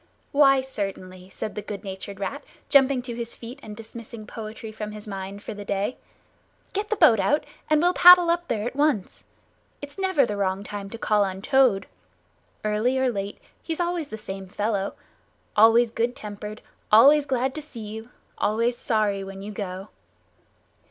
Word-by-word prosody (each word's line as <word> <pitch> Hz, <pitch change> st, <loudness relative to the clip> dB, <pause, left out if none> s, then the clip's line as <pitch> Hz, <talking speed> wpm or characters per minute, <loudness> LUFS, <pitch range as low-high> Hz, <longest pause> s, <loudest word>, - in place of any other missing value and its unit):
"Why, 275 Hz, -2 st, +5 dB
certainly," 190 Hz, -7 st, -6 dB
said 215 Hz, +2 st, -5 dB
the 210 Hz, -, -5 dB
good 205 Hz, 0 st, -7 dB
natured 195 Hz, 0 st, -7 dB
Rat, 205 Hz, +9 st, -4 dB, 0.3 s
jumping 270 Hz, -2 st, +4 dB
to 245 Hz, -1 st, -5 dB
his 235 Hz, 0 st, -6 dB
feet 240 Hz, +4 st, -9 dB
and 210 Hz, -4 st, -9 dB
dismissing 225 Hz, 0 st, -9 dB
poetry 220 Hz, 0 st, -8 dB
from 210 Hz, -1 st, -6 dB
his 210 Hz, 0 st, -9 dB
mind 195 Hz, 0 st, -6 dB
for -, -, -5 dB
the 205 Hz, 0 st, -8 dB
day. 200 Hz, +4 st, -2 dB, 0.8 s
"Get 415 Hz, +2 st, -2 dB
the 435 Hz, -, +1 dB
boat 300 Hz, -, +6 dB
out, 295 Hz, +8 st, +2 dB, 0.3 s
and 305 Hz, -1 st, +4 dB
we'll 350 Hz, +3 st, +3 dB
paddle 355 Hz, -1 st, +8 dB
up 345 Hz, 0 st, -1 dB
there 215 Hz, -2 st, -1 dB
at 245 Hz, -, -4 dB
once. 285 Hz, -9 st, 0 dB, 0.5 s
It's 285 Hz, +6 st, -10 dB
never 375 Hz, -8 st, +3 dB
the 210 Hz, -3 st, -4 dB
wrong 195 Hz, 0 st, -1 dB
time 205 Hz, -1 st, -6 dB
to 230 Hz, -, -7 dB
call 210 Hz, -2 st, +2 dB
on 190 Hz, 0 st, -4 dB
Toad. 260 Hz, -8 st, +3 dB, 0.8 s
Early 215 Hz, +5 st, +1 dB
or 260 Hz, -1 st, +2 dB
late 200 Hz, -2 st, -4 dB, 0.2 s
he's 325 Hz, 0 st, -4 dB
always 345 Hz, -3 st, -1 dB
the 220 Hz, -, -6 dB
same 195 Hz, -2 st, -7 dB
fellow. 205 Hz, 0 st, -2 dB, 0.6 s
Always 225 Hz, +2 st, +6 dB
good 235 Hz, +2 st, -1 dB
tempered, 210 Hz, 0 st, -8 dB, 0.3 s
always 280 Hz, +7 st, +7 dB
glad 260 Hz, 0 st, 0 dB
to 310 Hz, -, -5 dB
see 255 Hz, -7 st, -9 dB
you, 220 Hz, +2 st, -8 dB, 0.3 s
always 230 Hz, +3 st, +1 dB
sorry 210 Hz, -3 st, 0 dB
when 195 Hz, 0 st, -8 dB
you 210 Hz, -, -6 dB
go!" 195 Hz, -1 st, -6 dB
220 Hz, 175 wpm, -25 LUFS, 205-265 Hz, 0.8 s, paddle